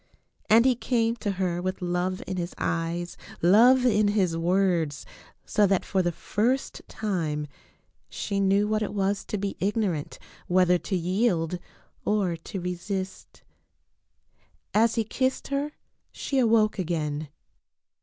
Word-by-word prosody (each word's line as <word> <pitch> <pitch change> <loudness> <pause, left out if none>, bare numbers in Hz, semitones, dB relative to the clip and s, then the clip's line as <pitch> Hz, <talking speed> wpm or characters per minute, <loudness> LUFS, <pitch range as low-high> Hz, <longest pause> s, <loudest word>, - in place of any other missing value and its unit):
And 230 +3 +6
he 260 - +5
came 235 -1 0
to 205 -3 -2
her 180 -2 -1
with 185 +1 -3
love 180 +1 -1
in 190 - -4
his 175 0 -4
eyes, 170 +1 -2 0.2
love 240 +8 +6
in 215 -4 +4
his 195 -5 +1
words, 170 -3 +1 0.4
so 205 -1 +3
that 195 -1 +1
for 190 - +1
the 175 -1 0
first 225 +10 -1
time 165 -8 -2 0.6
she 200 - -3
knew 200 +1 +3
what 215 0 0
it 210 - -3
was 195 0 0
to 210 - -3
be 200 0 -3
ignorant 195 -6 -1 0.3
whether 180 0 +4
to 195 - -3
yield 180 -1 0 0.4
or 200 -5 +1
to 165 +4 -7
re 180 0 -2
sist. 190 +1 -6 1.3
As 225 +2 +3
he 225 - +2
kissed 260 +4 -1
her 280 +2 -2 0.4
she 275 - -2
awoke 220 -4 +3
again. 155 -4 -2
195 Hz, 140 wpm, -26 LUFS, 175-215 Hz, 1.3 s, And